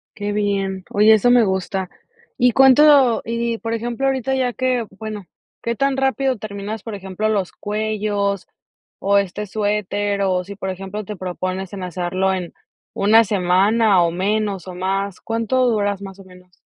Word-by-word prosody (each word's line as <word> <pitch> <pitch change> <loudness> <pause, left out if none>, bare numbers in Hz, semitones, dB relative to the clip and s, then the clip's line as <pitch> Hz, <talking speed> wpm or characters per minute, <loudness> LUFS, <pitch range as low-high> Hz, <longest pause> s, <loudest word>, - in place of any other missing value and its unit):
Qué 205 -1 -3
bien. 195 -2 -1
Oye, 210 +2 +5
eso 220 +3 +3
me 245 -1 +6
gusta. 190 -1 -2 0.5
¿Y 250 0 +4
cuánto? 270 0 +6
Y, 230 0 -2
por 230 0 -3
ejemplo, 240 +4 -2
ahorita 265 0 0
ya 250 -2 0
que 250 -2 0
bueno, 215 -3 -6 0.4
¿qué 235 0 -2
tan 275 +2 +1
rápido 270 -1 +1
terminas, 205 0 -6
por 225 -3 -6
ejemplo, 195 +2 -3
los 200 -4 -1
cuellos, 205 -2 -2 0.5
o 200 +1 +2
este 200 +2 -3
suéter? 205 0 -1
O 185 -1 +1
si, 200 +2 -9
por 190 -1 -5
ejemplo, 195 +3 -5
te 210 - -6
propones 185 +1 -4
en 190 -2 -6
hacerlo 185 +2 -1
en 180 -2 -4 0.4
1 220 +3 +5
semana, 195 +1 +3
o 170 - +1
menos, 200 0 -1
o 185 - -6
más, 195 +1 -2
¿cuánto 230 +3 0
duras, 205 -3 0
más 195 0 -9
o - - -11
menos? 180 -1 -19
205 Hz, 165 wpm, -20 LUFS, 190-225 Hz, 0.5 s, me